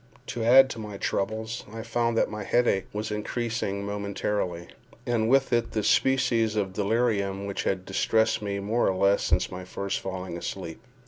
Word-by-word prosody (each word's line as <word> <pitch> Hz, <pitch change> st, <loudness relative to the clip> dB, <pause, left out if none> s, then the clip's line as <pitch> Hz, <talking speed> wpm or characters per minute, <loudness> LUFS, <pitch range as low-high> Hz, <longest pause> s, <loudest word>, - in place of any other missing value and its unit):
To 115 Hz, -, -3 dB
add 130 Hz, +3 st, +8 dB
to 115 Hz, -, -6 dB
my 105 Hz, -2 st, -6 dB
troubles, 110 Hz, +4 st, -2 dB
I 115 Hz, 0 st, -6 dB
found 115 Hz, 0 st, 0 dB
that -, -, +3 dB
my 105 Hz, -1 st, -5 dB
headache 120 Hz, -3 st, +2 dB
was 105 Hz, +1 st, -4 dB
increasing 105 Hz, -2 st, -2 dB
momentarily, 100 Hz, -3 st, -3 dB, 0.4 s
and 115 Hz, -2 st, +1 dB
with 135 Hz, 0 st, +3 dB
it 120 Hz, -1 st, +1 dB
the 110 Hz, -, 0 dB
species 115 Hz, -2 st, +2 dB
of 100 Hz, -3 st, -1 dB
delirium 100 Hz, -2 st, 0 dB
which 100 Hz, -1 st, -3 dB
had 95 Hz, -1 st, -1 dB
distressed 110 Hz, +3 st, +1 dB
me 100 Hz, -1 st, -2 dB
more 110 Hz, +4 st, +1 dB
or 95 Hz, -, 0 dB
less 100 Hz, +2 st, +3 dB
since -, -, +1 dB
my 90 Hz, 0 st, -6 dB
first 100 Hz, +2 st, -3 dB
falling 95 Hz, -2 st, -5 dB
asleep. 85 Hz, -2 st, -6 dB
105 Hz, 175 wpm, -27 LUFS, 100-115 Hz, 0.4 s, add